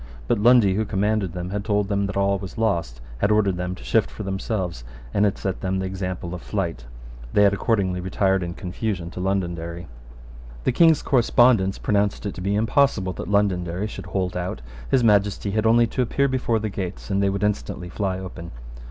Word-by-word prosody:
But - - +1
Lundy, 115 -3 +5
who 110 +3 +1
commanded 105 -2 0
them, 90 0 -5
had 100 0 -2
told 105 -1 +1
them 100 -1 0
that 100 - -4
all 100 0 +2
was 95 +2 -8
lost, 85 - -1 0.2
had 100 - +2
ordered 105 -4 +2
them 90 +1 -3
to - - -13
shift - - +2
for - - -7
themselves, 95 - -3 0.3
and 100 - +3
had 100 - 0
set 95 -1 -3
them 95 0 -1
the 95 - -2
example 90 -2 -4
of 90 - -6
flight, 85 - -3 0.5
They 105 - +5
had 100 -1 +5
accordingly 95 -4 0
retired 95 +1 +1
in 85 0 -4
confusion 90 -2 -4
to - - -7
Londonderry. 85 -3 -2 0.8
The - - +2
King's 160 +3 +4
correspondents 120 -6 +3
pronounced 100 0 0
it 100 - -3
to - - -8
be 100 +2 0
impossible 110 -3 +2
that - - -6
Londonderry 95 -2 +1
should 105 - -7
hold 90 -2 -2
out. 90 -6 -3 0.3
His 130 -2 +3
Majesty 105 -2 +2
had 110 +2 +1
only 115 +1 +5
to 120 +3 -2
appear 140 +3 +1
before 130 -3 0
the 110 0 -2
gates; 95 0 -5
and 100 0 +1
they 100 - +3
would 100 +1 -2
instantly 100 -3 -2
fly 95 0 -2
open. 90 -2 -8
100 Hz, 200 wpm, -23 LUFS, 90-105 Hz, 0.8 s, Lundy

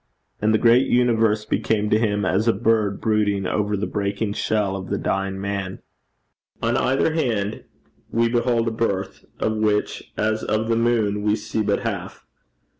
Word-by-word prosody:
And 105 +1 +3
the 110 - +4
great 120 +3 +4
universe 115 -3 +2
became 105 0 0
to 110 - +4
him 105 -3 0
as 100 +5 +1
a 115 - +5
bird 110 -1 +1
brooding 105 -3 +1
over 105 +2 0
the 100 - -1
breaking 100 +1 -2
shell 105 -2 0
of 95 -1 -6
the - - 0
dying 95 0 -2
man. 100 -1 -4 0.8
On - - 0
either 135 +5 +1
hand 110 -9 -1 0.4
we 115 0 +2
behold 120 -1 +1
a - - +1
birth, 100 -4 -2
of 110 0 0
which, 105 -1 -1
as 110 +1 0
of 110 +1 -1
the 115 - +3
moon, 115 -3 +1
we 105 0 +2
see 110 0 -3
but 105 - 0
half. - - -5
110 Hz, 170 wpm, -22 LUFS, 100-115 Hz, 0.8 s, a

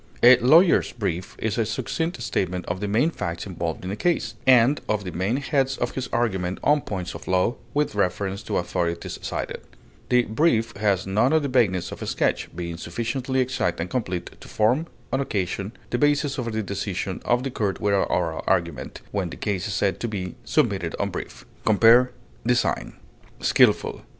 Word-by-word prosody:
A 125 +1 +10
lawyer's 165 +9 +5
brief 95 -5 -3
is 110 +1 -2
a - - +4
succinct 160 +7 -2
statement 90 -4 -1
of 90 +1 -3
the 105 - -2
main 115 +11 +2
facts 85 - -4
involved 85 -3 -4
in 95 - -3
a - - -2
case, 120 -3 0
and 130 +2 +5
of 105 -1 0
the 90 - -5
main 95 +9 0
heads 135 -1 0
of - - -1
his 130 -1 -4
argument 95 -6 0
on 150 0 +4
points 95 -7 -5
of - - -10
law, 95 +5 +2 0.2
with 150 -4 +1
reference 100 0 -1
to - - -2
authorities 85 -1 -2
cited; - - -4 0.5
the 125 -1 +4
brief 115 -1 +1
has 100 -2 +1
none 105 +9 +2
of 160 -1 +3
the - - 0
vagueness 110 -9 +1
of - - -8
a - - -4
sketch, - - 0
being 85 -1 -4
sufficiently 120 +9 -2
exact 125 -10 -1
and 85 +2 -3
complete 90 -8 -2
to - - -11
form, 125 +10 +1 0.3
on 135 - +2
occasion, 100 -4 -2 0.2
the 120 - 0
basis 145 0 +2
for 120 -3 -2
the 110 -1 -2
decision 95 -1 -3
of 120 +1 +1
the 135 - -3
court 105 -5 -1
without 100 -1 +1
oral 80 -2 -1
argument, 85 -5 -1
when 95 -4 -1
the - - -8
case 100 -2 -2
is 100 - -3
said 100 -2 0
to 120 - -2
be 95 -5 -4
"submitted - - 0
on - - -1
brief." - - -7 0.2
Compare 115 +4 +6 0.3
DESIGN. 120 0 0 0.5
SKILFUL. - - +3
105 Hz, 185 wpm, -24 LUFS, 95-125 Hz, 0.5 s, A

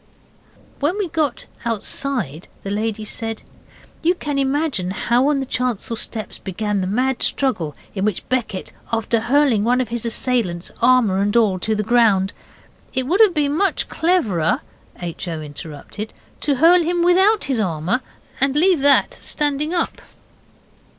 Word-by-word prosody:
When 305 +7 0
we 400 -4 -1
got 300 -6 -1 0.2
outside 225 - -2 0.2
the 195 - -4
lady 215 +1 -2
said, 225 0 -4 0.6
'You 350 +3 +2
can 290 -5 -3
imagine 270 - 0
how 240 +7 +1
on 295 -2 +2
the 270 - -2
chancel 245 -3 -2
steps 220 0 -4
began 205 +1 -2
the 185 - -1
mad 255 +6 0
struggle 180 - 0 0.2
in 190 - -2
which 210 -3 -1
Becket, 235 -7 -2 0.2
after 230 0 +1
hurling 245 -2 +3
one 245 +3 +2
of 250 -4 -1
his 235 -1 -2
assailants, 230 -7 -1
armour 235 -6 +4
and 205 +3 +2
all, 205 -5 +3
to 220 +4 0
the 210 - -1
ground 210 -4 +3 0.3
' - - -31
'It 260 - +1
would 365 - +2
have 405 -6 +5
been 290 -1 +1
much 390 +4 +1
cleverer,' 250 - +1 0.4
H. 175 +1 -5
O. 165 -2 -3
interrupted, 155 +7 -8 0.3
'to 285 - +1
hurl 340 +6 +6
him 345 +1 0
without 380 +5 +4
his 265 -4 -1
armour, 180 +5 0 0.4
and 270 +1 +2
leave 350 +2 +4
that 280 +1 +4
standing 295 +1 -1
up. 345 -2 -1
240 Hz, 155 wpm, -20 LUFS, 205-290 Hz, 0.6 s, hurl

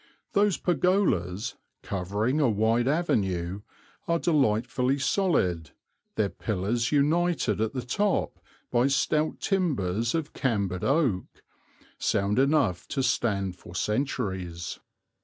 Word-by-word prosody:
Those 205 -3 +3
pergolas, 145 - +1 0.3
covering 100 +9 -1
a 140 -5 +4
wide 110 +3 +2
avenue, 100 - 0 0.5
are 170 - +2
delightfully 130 -4 +1
solid, 130 - 0 0.4
their 105 -2 +1
pillars 110 +4 -1
united 150 - +2
at 110 +2 0
the 130 -2 -3
top 200 +10 0 0.3
by 120 +2 +3
stout 150 +3 +1
timbers 120 - 0
of 160 -2 -3
cambered 100 -8 -1
oak, 135 - 0 0.6
sound 100 +4 +1
enough 135 - +2
to 135 -2 -1
stand 100 -7 0
for 85 - -12
centuries. 95 -7 -2
120 Hz, 105 wpm, -27 LUFS, 100-150 Hz, 0.6 s, a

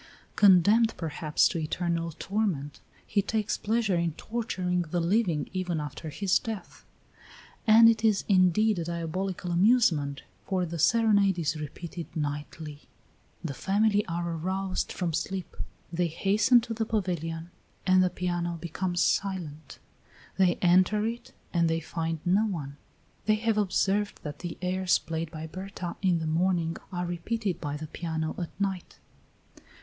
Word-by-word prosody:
Condemned 205 +4 +5
perhaps 155 -2 +1
to 170 - -2
eternal 170 +1 -1
torment, 190 -9 -2 0.3
he 205 - +1
takes 215 +1 -1
pleasure 215 -3 0
in 170 -2 0
torturing 185 -4 -2
the 175 +1 -2
living 170 -2 +1
even 180 -3 -1
after 150 +2 -6
his 190 +4 +1
death. 215 -6 -7 0.8
And 225 +1 +8
it 225 -1 +3
is 215 -3 +3
indeed 195 +2 +4
a 165 - -3
diabolical 175 +2 -3
amusement, 170 - +3 0.2
for 185 -2 0
the 170 0 -5
serenade 205 0 +4
is 160 -2 0
repeated 160 +3 -6
nightly; 150 0 -5 0.5
the 155 -5 -3
family 205 +6 +2
are 170 0 -2
aroused 185 +3 -2
from 175 -3 -2
sleep; 180 +4 -3 0.4
they 175 +1 +1
hasten 210 +8 +3
to 230 0 -5
the 225 0 -1
pavilion 170 -5 -2 0.3
and 185 0 +5
the 185 - +2
piano 175 -1 -2
becomes 175 +2 -1
silent; 165 -7 -2 0.6
they 185 -2 +3
enter 185 +4 +4
it 235 +1 -4 0.2
and 170 -2 +3
they 165 0 +1
find 165 0 -3
no 195 +5 +3
one. 145 -8 -5 0.5
They 215 - +5
have 220 0 +1
observed 200 +1 0
that 145 -1 -6
the 175 -2 -6
airs 185 0 +2
played 165 0 -4
by 160 -1 -7
Berta 185 +1 -6
in 185 -3 +3
the 160 - -3
morning 165 +1 +1
are 180 -1 -2
repeated 185 +3 -2
by 145 -2 -3
the 155 - -6
piano 160 0 -3
at 175 - -3
night. 195 -3 -3
180 Hz, 145 wpm, -28 LUFS, 165-200 Hz, 0.8 s, And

